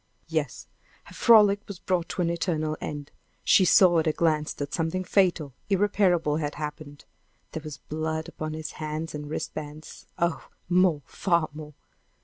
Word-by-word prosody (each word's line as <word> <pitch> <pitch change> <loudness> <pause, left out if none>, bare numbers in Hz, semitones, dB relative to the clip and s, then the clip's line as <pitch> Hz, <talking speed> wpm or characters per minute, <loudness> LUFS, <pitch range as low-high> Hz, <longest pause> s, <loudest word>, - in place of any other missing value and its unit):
Yes; - - -2 0.4
her - - -15
frolic 210 -4 +6
was 200 - -7
brought 180 -1 -1
to 180 - -1
an 170 - +1
eternal 160 -3 -1
end. 145 -1 -6 0.3
She 190 - +5
saw 175 -1 +6
at 160 - 0
a - - +4
glance 155 -1 +1
that 145 +1 -6
something 165 +3 -1
fatal, 175 -7 +1 0.2
irreparable, 185 -6 +2
had 150 -2 -3
happened. 150 -1 -7 0.5
There 160 - -5
was 150 -1 -8
blood 160 +1 -4
upon 155 -2 -5
his 155 0 -5
hands 155 +1 -5
and 150 -1 -6
wrist 155 0 -4
bands! 150 0 -9
Oh, 170 -1 -1 0.2
more 175 -4 +3
far 170 -4 0
more! 150 -1 -10
160 Hz, 160 wpm, -26 LUFS, 150-175 Hz, 0.5 s, frolic